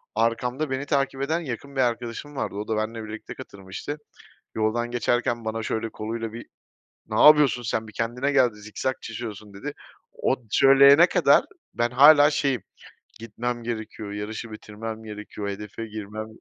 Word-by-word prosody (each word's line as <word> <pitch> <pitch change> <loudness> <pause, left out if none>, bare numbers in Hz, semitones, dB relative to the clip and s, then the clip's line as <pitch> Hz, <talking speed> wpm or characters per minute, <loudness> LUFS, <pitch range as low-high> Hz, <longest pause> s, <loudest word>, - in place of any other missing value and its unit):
Arkamda 125 +6 0
beni 135 +1 -2
takip 135 -2 0
eden 160 +5 0
yakın 140 -2 -6
bir 135 - +2
arkadaşım 120 +4 -2
vardı, 130 - -3
o 105 +1 -4
da 110 - -1
benle 110 +1 -3
birlikte 110 0 -8
katılmıştı. 100 +9 -7 0.6
Yoldan 115 +2 0
geçerken 120 -1 0
bana 110 0 -2
şöyle 110 +1 -2
koluyla 115 +1 -5
bir, 120 - -8 0.6
"Ne 110 0 0
yapıyorsun 150 -5 +7
sen, 110 -1 -2
bir 110 - -11
kendine 125 +6 -1
geldi, 125 -5 +4
zikzak 110 +5 -4
çiziyorsun." 110 -3 -7
dedi. 145 +9 -6 0.4
O 130 - 0
söyleyene 140 +6 +7
kadar - - +4 0.3
ben 120 0 +1
hâlâ 145 +3 +7
şeyim, 140 -4 0 0.6
"Gitmem 120 +2 -4
gerekiyor, 110 -2 -5
yarışı 110 +2 -5
bitirmem 110 +1 -7
gerekiyor, 105 -1 -6
hedefe 105 +2 -6
girmem" 110 0 -6
115 Hz, 150 wpm, -25 LUFS, 110-135 Hz, 0.6 s, yapıyorsun